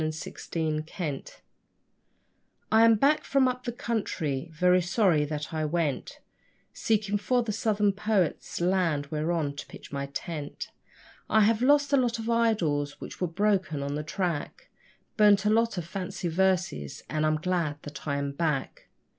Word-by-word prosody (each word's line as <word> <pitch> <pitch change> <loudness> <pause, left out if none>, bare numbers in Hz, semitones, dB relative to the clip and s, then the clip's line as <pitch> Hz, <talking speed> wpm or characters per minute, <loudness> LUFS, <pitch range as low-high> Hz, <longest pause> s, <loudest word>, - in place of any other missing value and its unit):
Up - - +1
the 155 0 -3
Country 155 -6 -6 1.3
I 220 +1 +6
am 230 -1 +6
back 280 +8 +3
from 275 -2 +3
up 250 0 -3
the 240 - -1
country 175 - -2
very 180 +3 +3
sorry 175 -4 +2
that 150 +1 -5
I 155 -1 -1
went 155 -3 -2 0.5
Seeking 210 -2 0
for 245 +4 +1
the 225 - -2
Southern 210 -1 +1
poets' 200 -4 -1
land 175 -5 +1
whereon 155 -2 -1
to - - -6
pitch - - -12
my 140 0 -3
tent; 145 +1 -6 0.6
I 220 - +5
have 215 +2 +3
lost 285 +2 +4
a - - +6
lot 240 -3 +1
of 225 +1 -3
idols, 170 -12 +1
which - - -9
were 180 - +2
broken 190 -4 0
on 140 0 -3
the 150 - -2
track, 175 - -3 0.5
Burnt 210 -2 +5
a 210 - +4
lot 230 -2 +2
of 175 - -3
fancy 180 -1 -4
verses, 175 - 0
and 155 0 -1
I'm 155 0 +3
glad 165 -3 -1
that 145 +1 -9
I 140 -1 0
am 140 0 -2
back. 150 -2 -2
180 Hz, 165 wpm, -28 LUFS, 155-215 Hz, 1.3 s, I